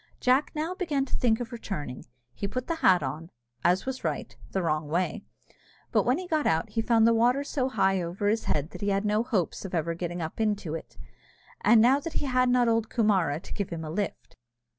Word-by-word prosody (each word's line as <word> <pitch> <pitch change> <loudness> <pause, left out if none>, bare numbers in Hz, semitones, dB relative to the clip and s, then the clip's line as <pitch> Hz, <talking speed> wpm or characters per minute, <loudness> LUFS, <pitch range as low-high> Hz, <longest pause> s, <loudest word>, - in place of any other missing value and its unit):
Jack 260 +3 +3
now 315 +4 -2
began 310 -8 -1
to - - -4
think 225 -3 +2
of 245 0 -5
returning; 180 - -6 0.3
he 200 - -4
put 255 +5 -3
the 335 - -2
hat 185 - +4
on, 155 +5 -5 0.3
as 180 +2 +3
was 260 0 -4
right, - - -3
the 190 - -1
wrong 155 -2 0
way; 175 +4 -1 0.7
but - - +2
when 250 +3 +3
he 370 - -5
got 310 -3 +1
out 165 +7 +1
he 225 +1 0
found 225 -1 +4
the 230 - +5
water 245 +5 +3
so 265 -2 -1
high 190 -6 +2
over 175 +4 -2
his 220 +2 +1
head 150 +2 -1
that - - -10
he 205 - 0
had 200 +1 0
no 210 +1 +2
hopes 210 -8 -1
of 190 -2 -4
ever 165 0 0
getting 175 +1 -4
up 160 +6 -4
into 205 -7 -1
it, 165 - -7 0.7
now 235 +4 +6
that 320 +3 -6
he 295 - -2
had 255 -1 +2
not 245 -1 +3
old 225 -1 +1
Coomara 190 - +2
to - - -9
give 200 -3 -3
him 165 -2 -5
a 155 - -5
lift. 200 +2 -4
210 Hz, 225 wpm, -27 LUFS, 175-250 Hz, 0.7 s, now